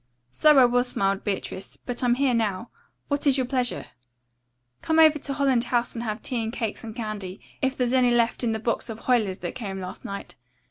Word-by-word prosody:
"So 300 Hz, -, +5 dB
I 260 Hz, -, +8 dB
was," 245 Hz, +1 st, +2 dB
smiled 195 Hz, -4 st, 0 dB
Beatrice, 195 Hz, -1 st, -4 dB
"but 245 Hz, +1 st, -4 dB
I'm 245 Hz, -1 st, +3 dB
here 265 Hz, -1 st, +2 dB
now. 220 Hz, -2 st, -1 dB, 0.4 s
What 285 Hz, 0 st, -1 dB
is 275 Hz, -1 st, +4 dB
your 260 Hz, -, +1 dB
pleasure?" 250 Hz, -1 st, -1 dB, 1.0 s
"Come 320 Hz, -, 0 dB
over 315 Hz, -2 st, +6 dB
to 280 Hz, -, -3 dB
Holland 270 Hz, -4 st, +2 dB
House 240 Hz, 0 st, 0 dB
and 235 Hz, -, -4 dB
have 215 Hz, -1 st, -4 dB
tea 245 Hz, -3 st, -2 dB
and 220 Hz, -, -3 dB
cakes 225 Hz, -4 st, -4 dB
and 220 Hz, -1 st, -7 dB
candy, 210 Hz, -5 st, -5 dB, 0.2 s
if 265 Hz, 0 st, 0 dB
there's 250 Hz, -1 st, 0 dB
any 255 Hz, -1 st, +4 dB
left 240 Hz, 0 st, +2 dB
in 235 Hz, -, +1 dB
the 220 Hz, -, -1 dB
box 230 Hz, +2 st, -2 dB
of 225 Hz, 0 st, -7 dB
Huyler's 220 Hz, -7 st, +1 dB
that 175 Hz, -, -3 dB
came 195 Hz, -5 st, -5 dB
last 185 Hz, -1 st, -7 dB
night. 200 Hz, 0 st, -7 dB
240 Hz, 215 wpm, -25 LUFS, 215-260 Hz, 1.0 s, I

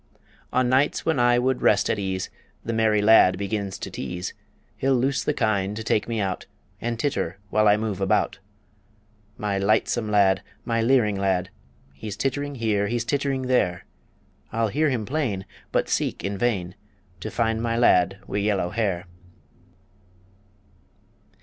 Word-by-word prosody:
On 130 Hz, 0 st, +2 dB
nights 130 Hz, +3 st, +2 dB
when 160 Hz, -5 st, +1 dB
I 120 Hz, 0 st, +4 dB
would 130 Hz, +1 st, +1 dB
rest 105 Hz, -, +3 dB
at 105 Hz, -, 0 dB
ease, 95 Hz, -1 st, -3 dB, 0.3 s
The 115 Hz, -, -2 dB
merry 110 Hz, -2 st, +2 dB
lad 105 Hz, -4 st, +6 dB
begins 100 Hz, -1 st, -3 dB
to -, -, -6 dB
tease; 90 Hz, 0 st, -5 dB, 0.4 s
He'll 135 Hz, 0 st, +1 dB
loose 135 Hz, +3 st, +1 dB
the -, -, +1 dB
kine 105 Hz, -6 st, 0 dB
to 110 Hz, -, -5 dB
take 105 Hz, -, +1 dB
me 115 Hz, -2 st, -2 dB
out, 95 Hz, -2 st, -2 dB, 0.3 s
And 120 Hz, -1 st, -2 dB
titter 95 Hz, -, -1 dB
while 110 Hz, 0 st, +3 dB
I 105 Hz, 0 st, +5 dB
move 105 Hz, -3 st, -3 dB
about. 95 Hz, 0 st, +1 dB, 1.0 s
My 105 Hz, -4 st, -1 dB
lightsome 110 Hz, +2 st, +1 dB
lad, 95 Hz, -2 st, +4 dB, 0.2 s
my 115 Hz, -1 st, 0 dB
leering 115 Hz, -5 st, +3 dB
lad, 95 Hz, -1 st, 0 dB, 0.4 s
He's 95 Hz, +9 st, -7 dB
tittering 145 Hz, +1 st, -2 dB
here; 105 Hz, -4 st, 0 dB
he's 115 Hz, +1 st, -1 dB
tittering 140 Hz, -1 st, -1 dB
there 100 Hz, -9 st, +1 dB, 0.7 s
I'll 115 Hz, -1 st, 0 dB
hear 155 Hz, +7 st, +1 dB
him 120 Hz, -5 st, -1 dB
plain, 120 Hz, -9 st, -2 dB, 0.3 s
but -, -, +1 dB
seek -, -, -1 dB
in 100 Hz, 0 st, -2 dB
vain 95 Hz, -5 st, -1 dB, 0.5 s
To -, -, -5 dB
find 115 Hz, -1 st, 0 dB
my 115 Hz, 0 st, -1 dB
lad 95 Hz, -5 st, +4 dB
wi' -, -, -4 dB
yellow 100 Hz, -4 st, 0 dB
hair. 95 Hz, -5 st, -1 dB
110 Hz, 155 wpm, -24 LUFS, 95-120 Hz, 1.0 s, lad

